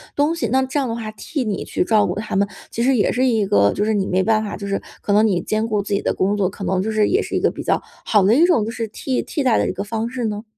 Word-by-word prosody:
东 295 +3 +2
西。 235 -8 -1
那 260 +4 +2
这 265 +3 -1
样 265 - -1
的 230 - -2
话， 220 -2 -5
替 275 +5 -4
你 210 -4 -3
去 - - -1
照 210 +1 +3
顾 - - -2
他 210 - -4
们， 200 +1 +2 0.2
其 230 - -3
实 265 0 +3
也 205 - +2
是 255 +2 +1
一 225 -5 +2
个 100 - +3
就 205 - -1
是 220 - +1
你 200 -2 0
没 185 +1 +1
办 220 0 +2
法 205 - -5
就 200 - -6
是， 195 0 -1 0.2
可 200 - -1
能 210 +2 +5
你 190 -5 +1
兼 215 +1 -1
顾 210 -2 0
自 200 0 -4
己 200 - +1
的 - - 0
工 200 +2 0
作， 195 -2 +1
可 195 - -9
能 190 -1 0
就 220 - -2
是 215 -1 +2
也 395 +4 +2
是 - - -5
一 - - +2
个 - - +2
比 - - -7
较 - - +1 0.2
好 210 -3 +3
的 205 +4 +4
一 320 +7 +5
种， 325 -12 +3
就 225 - -4
是 230 -2 -4
替 255 +4 -2
替 290 - -3
代 250 -4 +3
的 - - +1
一 - - -2
个 195 +2 -4
方 225 +2 -3
式 250 -2 -3
呢？ 210 0 -3
215 Hz, 355 characters per minute, -20 LUFS, 200-245 Hz, 0.2 s, 能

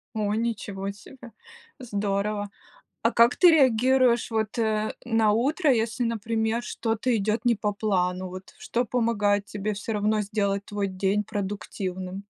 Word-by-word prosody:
О, 210 -1 0
ничего 205 -4 -3
себе! 235 +4 -13 0.5
Здорово! 205 -3 -2 0.5
А 230 - +2
как 235 +1 +4
ты 360 - +7
реагируешь, 255 -3 +4
вот, 220 0 -1
э, 215 -1 0
на 225 -3 +3
утро, 280 - +2
если, 230 +1 -1
например, 225 0 -1
что-то 230 +1 -1
идёт 215 +3 -1
не 240 -1 +4
по 210 0 -1
плану? 185 -3 -1
Вот, 185 +1 -10
что 240 - -1
помогает 210 -4 +1
тебе 210 +1 -3
всё 205 +3 -4
равно 215 +1 +1
сделать 200 -1 -1
твой 205 -1 -2
день 195 +2 0
продуктивным? 195 -1 -5
215 Hz, 140 wpm, -26 LUFS, 200-230 Hz, 0.5 s, ты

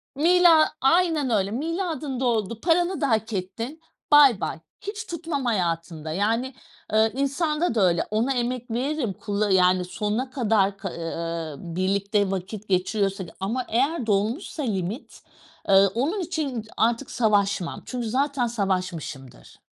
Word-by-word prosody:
Milad 335 +1 +6
aynen 320 -1 +3
öyle. 200 -3 +1
Miadın 315 - -3
doldu, 225 -3 -1
paranı 350 0 +2
da 280 - +1
hak 220 0 0
ettin, 225 - -5 0.3
bay 280 -8 +7
bay. 160 - -3 0.2
Hiç 425 +2 -5
tutmam 325 -6 -4
hayatımda. 165 -6 -1
Yani, 225 +8 0 0.4
eee, 220 0 +4
insanda 300 +1 0
da 215 - +2
öyle; 170 -1 +1
ona 235 +6 +1
emek 245 -1 -2
veririm, 255 -2 -1
kulla 205 0 -2
yani 185 -1 +4
sonuna 210 +7 -2
kadar 210 -6 +1
k 195 -2 -5
ııı, 165 -2 -4 0.2
birlikte 200 +2 +1
vakit 195 +2 -5
geçiriyorsak. 190 0 0
Ama 230 +6 -2
eğer 265 +3 +1
dolmuşsa 225 - -1
limit, 205 - -4 0.5
ııı, 195 0 +7
onun 300 - 0
için 315 -7 -3
ı 215 - -6
artık 235 +5 +1
savaşmam. 205 -6 +1
Çünkü 245 -3 -4
zaten 270 0 0
savaşmışımdır 185 - -4
225 Hz, 135 wpm, -24 LUFS, 195-280 Hz, 0.5 s, bay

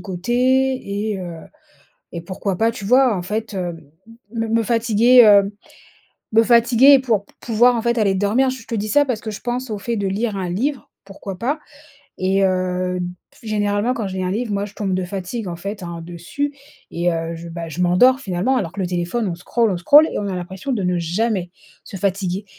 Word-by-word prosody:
côté 190 +4 -5 0.8
et - - -5
heu 175 -2 -6 0.8
et 170 - -4
pourquoi 185 +1 -4
pas, 225 - +3
tu 220 -4 -6
vois, 250 -1 +4
en 175 - -4
fait, 215 +2 -4
heu, 175 -2 -3 0.6
me 225 -1 -2
me 225 +1 +2
fatiguer, 235 +1 +5
heu, 200 -1 +6 0.8
me 225 - +6
fatiguer 240 +4 +6
pour 225 -6 0
p - - -24
pouvoir 240 +2 +3
en 230 - -1
fait, 235 0 0
aller 200 -3 +2
dormir. 210 +7 +2
Je 255 -3 -8
te 230 - -3
dis 210 0 -2
ça 290 +7 +4
parce 250 -5 -2
que 220 - -5
je 205 - -8
pense 245 0 -3
au 210 - -3
fait 230 +3 -3
de 200 - -1
lire 205 +2 -1
un 185 -2 -3
livre, 260 +9 -2 0.2
pourquoi 195 -1 -8
pas 275 - -1 0.6
et 195 +1 +2
heu, 185 -1 -1 0.3
p - - -26
généralement 205 +2 0
quand 225 -5 -3
je 190 - -7
lis 185 - -2
un 180 - -1
livre 220 +2 -2
moi 200 0 -1
je 205 - -14
tombe 200 -3 -2
de 185 0 -1
fatigue, 190 +3 -5
en 170 - -5
fait, 200 +3 -6
hein, 170 -1 -6
dessus 175 +12 -4 0.4
et 175 +1 0
heu, 165 0 -3
je 170 +1 -8
bah, 165 0 -6
je 160 +3 -6
m'endors 250 +10 +4
finalement 195 +6 0
alors 180 -8 -2
que 200 - -6
le 185 - 0
téléphone 180 +6 -2
on 170 - -3
scroll, 220 +5 0
on 185 - -1
scroll 285 - +6
et - - -2
on 205 - -3
a 190 - -3
l'impression 190 +8 -6
de 210 -5 -1
ne 180 -1 0
jamais 180 +2 -1 0.3
se 195 - -9
fatiguer. 195 0 -2
205 Hz, 220 wpm, -20 LUFS, 180-235 Hz, 0.8 s, heu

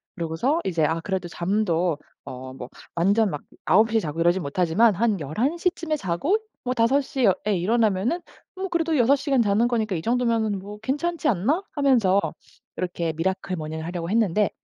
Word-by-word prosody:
그러고서 175 - 0
이제 170 -4 0
'아 165 +2 0
그래도 190 -2 -3
잠도 175 -3 0 0.3
어 130 0 -8
뭐 125 -1 -8 0.3
완전 200 +5 +3
막 145 - -5 0.2
9 215 +6 +4
시에 225 - +3
자고 160 -3 -5
이러진 175 +2 +3
못하지만 180 +9 +3
한 215 -2 +1
11 225 - -1
시쯤에 340 -3 -1
자고 275 - 0 0.3
뭐 250 0 -1
5 240 +5 +3
시어 250 -8 +2
에 205 - +2
일어나면은 220 - +1 0.3
뭐 380 +1 -3
그래도 330 -3 0
6 255 +4 +5
시간 275 -3 +1
자는 215 +3 +3
거니까 220 -5 0
이 160 - -3
정도면은 230 -4 +1
뭐 205 +2 -9
괜찮지 315 +5 -1
않나?' 255 - +1
하면서 240 -10 +3 0.6
이렇게 170 -3 -2
미라클 185 +3 -2
모닝을 160 0 -5
하려고 170 0 -4
했는데 210 -2 +2
205 Hz, 340 characters per minute, -24 LUFS, 170-250 Hz, 0.6 s, 6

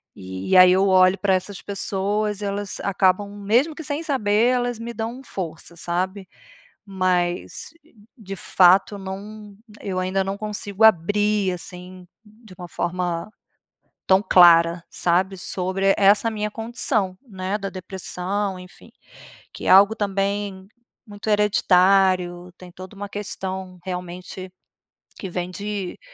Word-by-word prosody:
E 95 - -1
aí, 185 0 +8
eu 190 +1 +3
olho 185 0 +5
pra 190 0 +2
essas 185 +1 -5
pessoas; 205 +1 -2
elas 200 0 -4
acabam, 195 +1 +1 0.2
mesmo 255 +10 +2
que 320 - -8
sem 295 +2 -3
saber, 225 -7 +1
elas 245 -1 -1
me 235 +1 -6
dão 230 +3 -5
força, 170 -7 -7
sabe? 185 +3 -3 0.6
Mas 180 -2 -1 0.5
de 195 -4 -8
fato 190 +2 +4
não 200 +2 -9 0.3
eu 185 -2 -3
ainda 185 +1 0
não 195 +1 -4
consigo 210 0 -4
abrir, 205 0 +3
assim, 180 +1 -8 0.2
de 215 -1 -17
uma 180 - -8
forma 175 +2 -3 0.8
tão 190 +1 +4
clara, 170 -3 +5
sabe, 185 +3 0
sobre 190 +2 0
essa 205 +3 +4
minha 210 -1 -3
condição, 220 -4 -2
né, 190 0 -3
da 195 -1 -4
depressão, 190 +1 -4
enfim. 180 0 -15 0.6
Que - - -8
é - - +2
algo 200 +3 +7
também 200 -1 -2 0.4
muito 205 0 -9
hereditário, 185 -3 +2
tem 180 -1 -13
toda 185 +3 -11
uma 205 +1 -6
questão, 190 -2 -6
realmente, 180 0 -7 0.7
que 190 - -5
vem 180 0 -4
de 200 -1 -5
195 Hz, 130 wpm, -22 LUFS, 185-205 Hz, 0.8 s, aí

